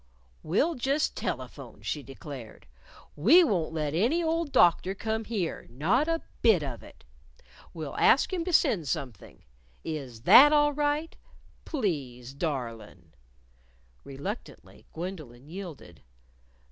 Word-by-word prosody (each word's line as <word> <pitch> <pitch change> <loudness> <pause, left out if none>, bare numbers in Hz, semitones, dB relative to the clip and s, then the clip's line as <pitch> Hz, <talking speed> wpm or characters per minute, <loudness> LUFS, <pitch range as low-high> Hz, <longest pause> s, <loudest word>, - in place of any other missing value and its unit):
"We'll 245 - +1
just 275 +3 0
telephone," - - -6
she 150 - -3
declared, 135 -3 -10 0.5
"We 250 - +6
wont 180 - 0
let 155 -2 -2
any 245 - +1
old 325 -2 -1
doctor 180 0 +4
come 220 +2 -3
here 200 -8 -3
not 185 - +1
a 330 0 -1 0.2
bit 205 -9 +4
of 130 -4 -6
it. - - -16 0.7
We'll 155 -4 -7
ask 280 - +4
him 350 -3 -1
to 365 - -2
send 190 - +2
something. 125 -5 -6 0.4
Is 135 -8 -6
that 290 - +8
all 295 -1 +4
right. 295 +2 -1 0.5
Please, 135 - -3
darlin'." 125 -8 -5 0.9
Reluctantly, 145 - -8
Gwendolyn 155 -8 -8
yielded. 160 - -9
175 Hz, 120 wpm, -28 LUFS, -, 0.9 s, that